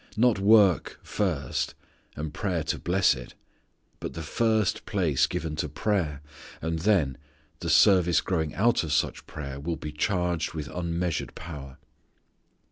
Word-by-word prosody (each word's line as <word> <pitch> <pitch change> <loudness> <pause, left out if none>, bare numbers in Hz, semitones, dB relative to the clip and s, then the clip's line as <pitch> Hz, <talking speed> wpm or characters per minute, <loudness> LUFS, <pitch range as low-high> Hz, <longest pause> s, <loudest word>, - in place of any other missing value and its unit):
Not 120 -2 +4
work 100 -3 +4
first, 85 -11 -1 0.4
and 75 0 -5
prayer 90 -6 -1
to 80 - -2
bless 95 0 +3
it. 60 -2 -9 0.6
But - - -5
the 80 - -6
first 110 +4 +1
place 85 -10 +2
given 80 -1 -3
to - - -2
prayer 80 -9 -1 0.4
and 80 +1 -2
then 80 - +2 0.4
the 85 - -3
service 90 +1 +5
growing 80 -5 -1
out 115 +1 +3
of 80 - -4
such - - 0
prayer 70 -2 -6
will 85 +4 -2
be 75 -1 -6
charged 85 +1 -1
with 75 -3 -4
unmeasured 85 0 -2
power. 70 -4 -8
85 Hz, 140 wpm, -27 LUFS, 75-95 Hz, 0.6 s, service